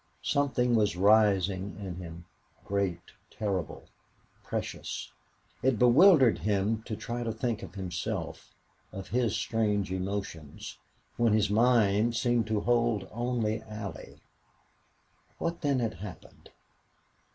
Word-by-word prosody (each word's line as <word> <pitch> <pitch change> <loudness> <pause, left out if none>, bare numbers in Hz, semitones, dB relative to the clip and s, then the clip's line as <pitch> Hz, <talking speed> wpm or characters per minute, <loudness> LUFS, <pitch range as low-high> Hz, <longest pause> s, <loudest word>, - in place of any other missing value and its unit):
Something 135 -4 +1
was 105 -6 +2
rising 100 -1 +3
in 95 -4 -6
him 85 -1 -9 0.4
great 95 -4 -2 0.2
terrible 100 -7 -3 0.6
precious. - - -5 0.5
It 130 -1 +2
bewildered 130 - +6
him 105 +4 0
to 110 - -3
try 120 +3 -4
to 115 -1 -2
think 120 -2 -2
of 95 -1 -9
himself, 90 -3 -5 0.4
of 95 0 -8
his 120 -3 +1
strange 105 -4 0
emotions, 95 -5 -5 0.4
when 115 -2 +3
his 105 -1 +2
mind 115 -1 +3
seemed 120 -1 +1
to 110 -2 0
hold 115 -4 +1
only 115 -2 -1
Allie. 105 -2 -8 1.2
What 170 0 -3
then 145 -4 +1
had 115 -5 -1
happened? 90 0 -11
105 Hz, 115 wpm, -29 LUFS, 95-120 Hz, 1.2 s, bewildered